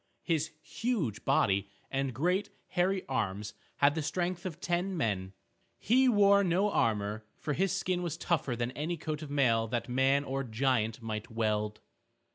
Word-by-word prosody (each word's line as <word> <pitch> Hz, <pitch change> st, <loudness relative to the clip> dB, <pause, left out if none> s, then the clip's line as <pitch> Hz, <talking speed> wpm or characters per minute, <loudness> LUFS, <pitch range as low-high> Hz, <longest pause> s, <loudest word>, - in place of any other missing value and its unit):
His 160 Hz, -3 st, 0 dB
huge 220 Hz, -, -2 dB
body 100 Hz, +1 st, +2 dB, 0.2 s
and 135 Hz, 0 st, 0 dB
great 180 Hz, -, 0 dB, 0.2 s
hairy 185 Hz, +1 st, +1 dB
arms 105 Hz, -4 st, -2 dB, 0.2 s
had 140 Hz, +1 st, +4 dB
the 160 Hz, -, -2 dB
strength 175 Hz, +3 st, -2 dB
of 170 Hz, -2 st, -7 dB
ten 180 Hz, +2 st, -1 dB
men. 100 Hz, -, -1 dB, 0.4 s
He 255 Hz, +4 st, +4 dB
wore 200 Hz, -2 st, +5 dB
no 190 Hz, +3 st, +2 dB
armor, 105 Hz, -, 0 dB
for 150 Hz, 0 st, -2 dB
his 190 Hz, +4 st, +1 dB
skin 185 Hz, -2 st, 0 dB
was 170 Hz, -3 st, -3 dB
tougher 160 Hz, -8 st, 0 dB
than 120 Hz, +1 st, -2 dB
any 160 Hz, +6 st, -3 dB
coat 155 Hz, -1 st, -4 dB
of 155 Hz, -, -7 dB
mail 120 Hz, -6 st, +2 dB
that 120 Hz, +1 st, -2 dB
man 135 Hz, +3 st, +3 dB
or 135 Hz, 0 st, -2 dB
giant 115 Hz, -2 st, 0 dB
might 110 Hz, +1 st, -4 dB
weld. 105 Hz, -2 st, -1 dB
140 Hz, 160 wpm, -31 LUFS, 115-180 Hz, 0.4 s, wore